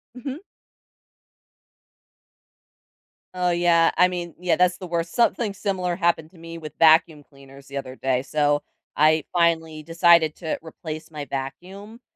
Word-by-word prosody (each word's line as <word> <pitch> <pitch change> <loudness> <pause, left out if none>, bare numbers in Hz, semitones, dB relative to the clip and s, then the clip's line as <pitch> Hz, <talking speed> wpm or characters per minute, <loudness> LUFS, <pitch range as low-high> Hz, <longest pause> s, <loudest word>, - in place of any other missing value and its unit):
Mhm. 270 +4 -7 2.9
Oh, 180 -1 0
yeah, 170 -1 +3
I 180 +1 +5
mean 175 -2 -6
yeah, 175 -3 +1
that's 180 0 +2
the 185 - -8
worst, 170 -1 -3
something 235 -3 +1
similar 185 -3 -2
happened 170 -3 0
to 185 - -20
me 165 0 -9
with 155 -3 -9
vacuum 160 -1 +4
cleaners 140 -1 -17
the 140 - -7
other 130 -1 -6
day, 130 -1 -1
so, 145 0 +1 0.4
I 155 +1 +4
finally 165 -2 0
decided 165 -1 +4
to 160 -3 -3
replace 155 -1 -8
my 150 -2 -7
vacuum, 185 - -7
165 Hz, 140 wpm, -23 LUFS, 155-180 Hz, 2.9 s, I